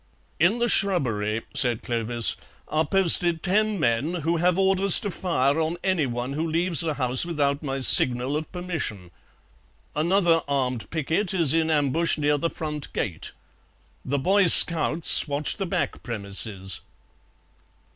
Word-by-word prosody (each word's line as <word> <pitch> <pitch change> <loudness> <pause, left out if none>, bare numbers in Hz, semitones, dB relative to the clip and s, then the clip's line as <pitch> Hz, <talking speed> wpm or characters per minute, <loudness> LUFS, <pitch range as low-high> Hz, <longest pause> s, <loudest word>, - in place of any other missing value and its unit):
"In 175 +9 +2
the 240 0 -1
shrubbery," 115 - 0
said 120 -3 -2
Clovis, 115 0 -1 0.3
"are 155 0 -2
posted 175 -3 +2
ten 210 +2 -1
men 135 +6 -1
who 170 +1 -1
have 175 +2 0
orders 195 0 +2
to 205 - -5
fire 150 -5 -1
on 160 +2 -3
anyone 135 -9 -3
who 160 +3 -4
leaves 170 -1 0
the 160 -3 +1
house 130 -2 -2
without 145 -4 -2
my 135 -3 -5
signal 125 +1 +3
of 155 0 -6
permission. 160 - -6 0.8
Another 170 +1 +1
armed 130 -4 -3
picquet 165 +5 -3
is 165 -6 +1
in 160 0 0
ambush 155 +2 0
near 145 -1 -1
the 170 - -2
front 150 -3 -7
gate. 90 -6 -5 0.7
The 140 +2 -3
Boy 190 +6 +1
scouts 165 -1 +7
watch 145 +1 -3
the 195 - -5
back - - -4
premises." 100 -4 -6
155 Hz, 140 wpm, -23 LUFS, 130-175 Hz, 0.8 s, scouts